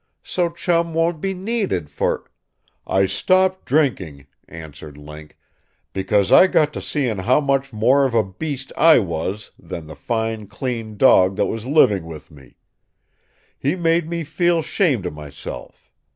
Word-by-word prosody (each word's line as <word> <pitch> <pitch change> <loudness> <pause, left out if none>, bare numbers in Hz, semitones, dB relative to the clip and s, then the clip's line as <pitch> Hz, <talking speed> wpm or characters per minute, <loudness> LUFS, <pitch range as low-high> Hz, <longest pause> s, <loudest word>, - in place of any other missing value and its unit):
So 175 -2 -1
Chum 170 -1 -1
won't 165 -1 0
be 195 -1 -2
needed 190 - -2
for - - -2 0.3
" - - -51 0.3
"I 95 0 +2
stopped 185 - +1
drinking," 100 - -1 0.2
answered 75 -2 -11
Link, 75 +1 -12 0.6
"because 95 +1 +1
I 190 - +8
got 150 -4 +2
to - - -5
seeing 125 -9 -2
how 125 +9 +3
much 140 -1 0
more 125 +6 +3
of 125 -3 -2
a 110 - +4
beast 130 +7 -6
I 165 0 +6
was 95 +1 -3
than 80 - -8
the 80 0 -10
fine 110 - -3
clean 110 0 -5
dog 95 -7 +5
that - - +1
was 115 +2 -5
living 105 - +3
with 80 -1 -11
me. 70 -4 -18 1.0
He 145 +6 0
made 165 -2 +1
me 170 -1 -3
feel 170 +2 0
'shamed 145 - 0
of 90 - -4
myself. 75 -2 -10
120 Hz, 155 wpm, -20 LUFS, -, 1.0 s, I